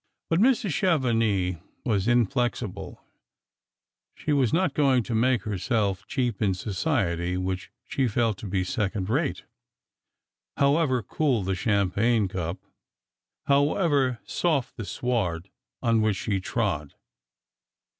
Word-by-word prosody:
But 165 - +3
Mrs. 230 -3 +3
Chevenix 115 - +1 0.3
was 105 -4 +1
inflexible; 120 -5 0 1.1
she 150 - -2
was 135 -5 +2
not 170 -3 +1
going 135 -5 +3
to 115 - -4
make 120 +2 +2
herself 105 -1 -1
cheap 125 -7 -1
in 100 -3 +2
society 90 - -1
which 95 0 -3 0.2
she 135 -2 0
felt 115 -3 0
to 110 - -6
be 95 -1 0
second 95 +2 -2
rate, 140 +3 0 1.1
however 140 -3 +2
cool 130 -1 0
the 95 +1 -1
cham 100 0 +1
pagne 110 +1 +2
cup, 90 -2 -3 0.9
however 140 -2 +2
soft 155 -8 0
the 115 - -6
sward 100 -8 -2 0.3
on 115 -2 +3
which 110 -2 +2
she 100 -4 -1
trod. 75 -5 -2
115 Hz, 120 wpm, -26 LUFS, 95-135 Hz, 1.1 s, But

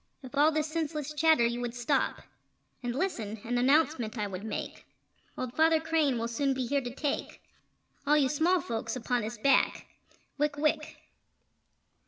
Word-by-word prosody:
If 260 +2 -9
all 295 +3 +5
this 310 -1 0
senseless 305 -2 -3
chatter 310 -4 +4
you 235 +1 -1
would 240 -1 -4
stop, 250 +3 0 0.6
And 245 -1 -3
listen, 230 - -2
an 245 +1 -1
announcement 260 -3 +2
I 210 - -1
would 195 -1 -6
make: 220 - -5 0.5
Old 255 -1 -4
Father 320 0 +4
Crane 315 -5 +1
will 230 0 -2
soon 270 +4 0
be 260 -1 -1
here 280 +3 0
to 245 - -5
take 290 0 -3 0.7
All 300 +1 +5
you 280 -3 +4
small 325 +6 +2
folks 225 0 -3
upon 245 0 -1
his 220 +3 -5
back 275 +6 +2 0.5
Wick 295 0 0
wick! 305 +1 0
275 Hz, 165 wpm, -29 LUFS, 235-305 Hz, 0.7 s, all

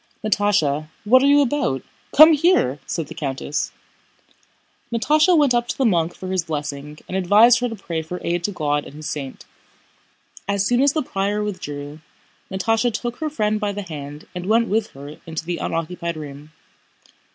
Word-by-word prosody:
"Natásha, 185 -9 +1 0.2
what 250 +5 +5
are 275 - +4
you 285 +1 +6
about? 265 - 0 0.3
Come 310 +2 +10
here!" 295 - +2
said 165 - -2
the - - -10
countess. 140 0 -3 1.2
Natásha 305 +9 +3
went 285 -4 +4
up 240 0 +1
to - - -4
the 270 - +1
monk 175 -5 +1
for 185 - -7
his 185 -2 0
blessing, 150 -1 -5
and 185 - -5
he - - +2
advised 210 +6 +6
her 245 0 -1
to 225 - -6
pray 170 -5 -4
for 180 +3 -6
aid 175 0 -1
to 205 - -1
God 145 -5 -1
and 140 - -12
His 155 0 -7
saint. 135 -3 -6 1.0
As 200 0 +1
soon 245 +4 +2
as 280 0 +4
the 310 - 0
prior 205 -2 -1
withdrew, 150 -7 -6 0.5
Natásha 225 +5 +1
took 240 +2 -4
her 310 -1 -2
friend 215 -7 0
by 210 -1 -1
the 205 0 -5
hand 150 -3 -8
and 180 0 -6
went 230 +2 +3
with 215 +1 +1
her 145 +2 -10
into 160 0 -5
the 175 0 -2
unoccupied 170 0 -3
room. 145 0 -9
190 Hz, 185 wpm, -21 LUFS, 155-235 Hz, 1.2 s, Come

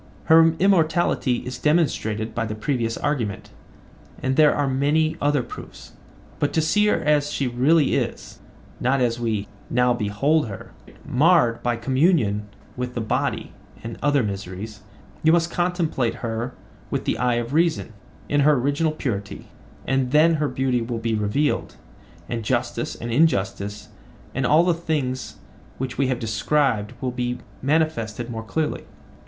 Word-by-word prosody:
Her 165 0 +6
immortality 165 -9 +2
is 125 0 -5
demonstrated 115 -9 0
by 115 0 -2
the 110 - -4
previous 115 0 -1
argument, 125 -9 -2 0.7
and 130 0 -1
there 150 0 +6
are 145 -1 +1
many 150 +4 +1
other 145 -2 +2
proofs; 120 - -11 0.5
but 145 - +1
to - - +2
see 210 +7 +2
her - - +2
as 150 -1 +1
she 140 - -1
really 135 +5 +3
is, - - -3 0.4
not 130 +2 +1
as 120 -2 +1
we 110 -4 -1 0.2
now 125 0 +3
behold 120 +7 +1
her, 100 -3 -9 0.3
marred 140 -4 +3
by 120 -1 0
communion 125 - +1 0.3
with 125 0 -4
the - - -1
body 110 - -2 0.3
and 115 0 -5
other 145 -2 +2
miseries, 100 +1 -6 0.4
you 160 - +4
must 170 0 +2
contemplate 175 -9 0
her 115 +2 -3 0.3
with - - -2
the - - -1
eye 125 0 +2
of 120 +2 -3
reason, 160 -7 +1 0.3
in 145 - +1
her 150 +2 +5
original 145 +4 +1
purity; 100 -10 -4 0.4
and 135 -1 +1
then 155 +4 +5
her 150 - +2
beauty 130 -3 0
will 115 0 -3
be 115 0 -2
revealed, 110 +8 0 0.5
and 115 -1 -3
justice 120 0 -1
and 120 0 -6
injustice 105 -7 0 0.4
and 135 -2 0
all 155 +3 +5
the 175 0 +3
things 150 -6 -3 0.4
which 130 0 -4
we 135 - +3
have 130 -1 0
described 115 0 0
will 130 -2 -1
be 125 0 -2 0.2
manifested 130 -6 0
more 110 -1 -4
clearly. 150 +7 -2
130 Hz, 150 wpm, -23 LUFS, 115-150 Hz, 0.7 s, Her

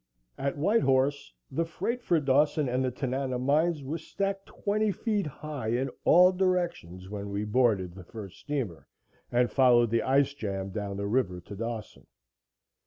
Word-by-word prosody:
At 140 +1 -2
White 210 +10 +3
Horse 135 - +1 0.2
the 165 - 0
freight 235 +9 -3
for 175 -8 +2
Dawson 145 +1 +2
and 125 +1 0
the 130 - +1
Tanana 130 0 -2
mines 150 +4 +1
was 150 +5 -4
stacked 195 0 -3
twenty 210 +1 0
feet 210 -3 -1
high 150 -4 -6
in 130 +2 0
all 180 +2 +7
directions 175 - -1
when 100 0 -6
we 100 +1 -2
boarded 105 -6 +2
the 95 0 -10
first 100 0 -10
steamer 130 - -4 0.4
and 120 -2 +2
followed 120 -3 +5
the 115 - +2
ice 140 +1 +2
jam 100 -7 -4
down 100 0 -4
the 100 - -3
river 100 -5 0
to 100 +4 -10
Dawson. 115 +1 -6
130 Hz, 165 wpm, -28 LUFS, 105-155 Hz, 0.4 s, all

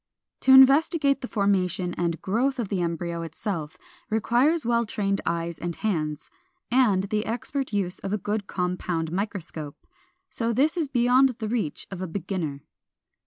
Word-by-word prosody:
To 265 - +3
investigate 275 +2 +6
the 250 - -4
formation 185 -4 0
and 170 -1 -1
growth 255 +8 0
of 230 -6 -3
the 195 -3 -1
embryo 170 0 -2
itself 160 -1 -5 0.3
requires 240 +9 +2
well 235 0 +2
trained 200 -2 -1
eyes 170 -1 -2
and 170 -1 -4
hands, 155 -8 -2 0.4
and 230 -7 +4
the 210 +2 -1
expert 255 +3 -3
use 195 -3 -2
of 195 - -5
a 210 - +1
good 205 +1 -3
compound 180 -3 -2
microscope. 175 -6 -5 0.5
So 230 0 -1
this 285 +8 +2
is 320 -5 -1
beyond 255 +1 +4
the 220 - -4
reach 215 -9 -2
of 185 -2 -6
a 185 - -3
beginner. 165 -6 -4
200 Hz, 155 wpm, -25 LUFS, 175-240 Hz, 0.5 s, investigate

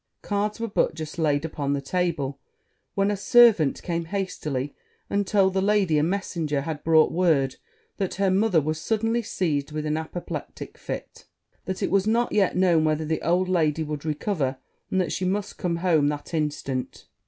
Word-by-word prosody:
Cards 210 +1 -1
were 230 - -2
but 200 - +1
just 155 0 -6
laid 150 -1 +1
upon 145 -3 -2
the 140 - 0
table, 145 -2 -2 0.6
when 200 +1 +2
a - - 0
servant 205 - +5
came 170 -2 -2
hastily, 155 -7 -3 0.4
and 200 -1 +1
told 195 -2 +3
the 190 - +1
lady 195 -6 +3
a - - +2
messenger 165 -5 -1
had 150 0 -5
brought 160 -1 +5
word 155 -7 +2 0.4
that 195 -2 -2
her 195 -1 +2
mother 195 -2 +3
was 155 +1 -2
suddenly 225 +3 0
seized 155 -9 -1
with 155 0 -3
an 155 0 0
apoplectic 160 +2 -6
fit; - - -7 0.4
that 190 - -3
it - - 0
was 195 +1 +2
not 235 +2 +2
yet 195 -4 +2
known 175 -4 +4
whether 155 0 +1
the 160 +1 -1
old 180 +2 +2
lady 160 -4 +1
would 150 -1 -5
recover, 150 -3 -1 0.3
and 190 - +1
that 180 -4 0
she - - -2
must 195 +2 -2
come 175 -2 0
home 170 -4 +2
that 145 +3 -4
instant. 145 -4 -3
170 Hz, 180 wpm, -25 LUFS, 150-195 Hz, 0.6 s, servant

